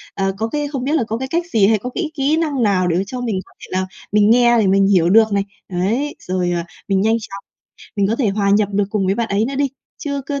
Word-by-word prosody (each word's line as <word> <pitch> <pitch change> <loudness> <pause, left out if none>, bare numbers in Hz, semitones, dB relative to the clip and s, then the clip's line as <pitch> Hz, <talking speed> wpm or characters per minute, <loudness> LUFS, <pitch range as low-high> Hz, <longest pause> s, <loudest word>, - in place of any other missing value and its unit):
ờ, 195 -1 0
có 225 +1 -1
cái 295 +1 -2
không 275 -3 -4
biết 290 +3 -1
là 250 - +2
có 225 - -2
cái 265 +1 -4
cách 340 +4 -1
gì 200 -3 +5
hay 220 -1 +3
có 250 - -5
cái 325 -4 -2
kỹ 285 +3 +1
năng 290 -7 0
nào 185 -3 +2
để 170 0 +1
mà 190 - +1
cho 250 +1 -5
mình 220 -6 -1
có - - -23
thể - - -10
là 190 - -1 0.3
mình 210 0 +4
nghe 240 -1 +5
để 205 - +2
mình 195 +1 +4
hiểu 175 -4 +3
được 220 +1 +5
này, 200 0 +2 0.3
ấy, 225 +12 -1
rồi, 180 -1 -2
à, 170 -1 -2 0.2
mình 195 -1 +2
nhanh 225 +2 +2
chóng, 200 -3 -9 0.5
mình 200 -1 +2
có 225 - 0
thể 240 -7 +1
hòa 200 0 0
nhập 205 0 +3
được 200 0 +2
cùng 200 -3 0
với 195 - +2
bạn 235 0 -2
ấy 200 +2 +1
nữa 275 - -4
đi. 280 0 +1 0.3
Chứ 280 -1 -3
cứ 280 -1 -3
215 Hz, 290 wpm, -19 LUFS, 195-265 Hz, 0.5 s, gì